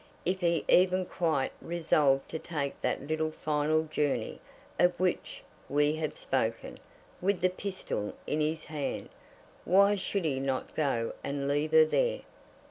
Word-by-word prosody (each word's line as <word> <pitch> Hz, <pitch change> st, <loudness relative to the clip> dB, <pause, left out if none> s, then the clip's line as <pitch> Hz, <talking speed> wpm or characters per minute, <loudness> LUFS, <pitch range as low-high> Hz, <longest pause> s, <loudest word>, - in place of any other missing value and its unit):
If 185 Hz, +2 st, 0 dB
he 170 Hz, -2 st, +1 dB
even 185 Hz, 0 st, +4 dB
quite 160 Hz, -7 st, 0 dB
resolved 150 Hz, -5 st, +2 dB
to 160 Hz, -, -4 dB
take 145 Hz, -5 st, -4 dB
that -, -, -1 dB
little 155 Hz, 0 st, 0 dB
final 155 Hz, 0 st, 0 dB
journey 150 Hz, -2 st, -2 dB, 0.4 s
of 175 Hz, 0 st, +3 dB
which 185 Hz, -1 st, -1 dB, 0.3 s
we 145 Hz, +2 st, +2 dB
have 155 Hz, -1 st, -3 dB
spoken, 115 Hz, -4 st, -2 dB, 0.4 s
with 195 Hz, +1 st, +1 dB
the 185 Hz, 0 st, +3 dB
pistol 185 Hz, -, -4 dB
in 155 Hz, -, -1 dB
his 155 Hz, +1 st, -1 dB
hand, 150 Hz, -2 st, -4 dB, 0.5 s
why 200 Hz, +2 st, +5 dB
should 195 Hz, -1 st, -2 dB
he 135 Hz, -4 st, 0 dB
not 135 Hz, -1 st, -2 dB
go 120 Hz, -7 st, 0 dB
and 140 Hz, 0 st, -2 dB
leave 145 Hz, +2 st, 0 dB
her 160 Hz, 0 st, +7 dB
there? -, -, +1 dB
155 Hz, 145 wpm, -30 LUFS, 145-180 Hz, 0.5 s, her